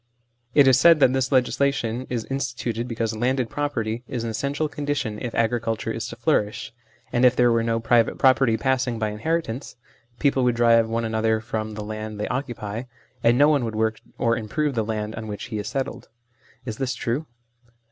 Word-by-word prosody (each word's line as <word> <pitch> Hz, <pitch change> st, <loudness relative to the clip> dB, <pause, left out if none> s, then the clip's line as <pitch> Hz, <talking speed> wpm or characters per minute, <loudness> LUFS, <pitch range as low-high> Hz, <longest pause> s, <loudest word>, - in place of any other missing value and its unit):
It 145 Hz, -2 st, +7 dB
is 130 Hz, -1 st, +6 dB
said 165 Hz, +2 st, +7 dB
that 130 Hz, -2 st, +5 dB
this 130 Hz, 0 st, 0 dB
legislation 130 Hz, -2 st, +1 dB
is 120 Hz, -3 st, -2 dB
instituted 125 Hz, -3 st, -3 dB
because 115 Hz, -2 st, -2 dB
landed 125 Hz, +1 st, 0 dB
property 120 Hz, -6 st, -2 dB
is 120 Hz, -3 st, -4 dB
an 115 Hz, -, -2 dB
essential 140 Hz, +6 st, -1 dB
condition 145 Hz, -7 st, -3 dB
if 120 Hz, -3 st, -4 dB
agriculture 115 Hz, -1 st, 0 dB
is 115 Hz, 0 st, -4 dB
to -, -, -7 dB
flourish, 115 Hz, 0 st, 0 dB, 0.4 s
and 120 Hz, 0 st, +2 dB
if 125 Hz, -1 st, +6 dB
there 120 Hz, -1 st, +4 dB
were 115 Hz, 0 st, +3 dB
no 115 Hz, 0 st, 0 dB
private 115 Hz, 0 st, +2 dB
property 130 Hz, -3 st, +4 dB
passing 130 Hz, -2 st, 0 dB
by 110 Hz, -1 st, -1 dB
inheritance, 130 Hz, +3 st, -3 dB, 0.4 s
people 135 Hz, -2 st, +2 dB
would 125 Hz, -1 st, +2 dB
drive 115 Hz, -1 st, +4 dB
one 115 Hz, 0 st, -1 dB
another 110 Hz, 0 st, +1 dB
from 110 Hz, -1 st, -4 dB
the 105 Hz, -, -5 dB
land 110 Hz, 0 st, -6 dB
they 105 Hz, -, -2 dB
occupy, 120 Hz, -3 st, -4 dB, 0.4 s
and 120 Hz, +1 st, +4 dB
no 145 Hz, +2 st, +6 dB
one 145 Hz, -4 st, +3 dB
would 110 Hz, -2 st, -3 dB
work 110 Hz, 0 st, 0 dB, 0.2 s
or 115 Hz, -1 st, +2 dB
improve 135 Hz, +6 st, -1 dB
the 115 Hz, -3 st, 0 dB
land 110 Hz, 0 st, -3 dB
on 110 Hz, 0 st, -6 dB
which 105 Hz, +3 st, -6 dB
he 105 Hz, -, -1 dB
is 105 Hz, -, -5 dB
settled. 135 Hz, -1 st, -4 dB, 0.6 s
Is 110 Hz, -3 st, -5 dB
this 130 Hz, -2 st, -2 dB
true 135 Hz, +6 st, -2 dB
115 Hz, 190 wpm, -24 LUFS, 110-130 Hz, 0.6 s, It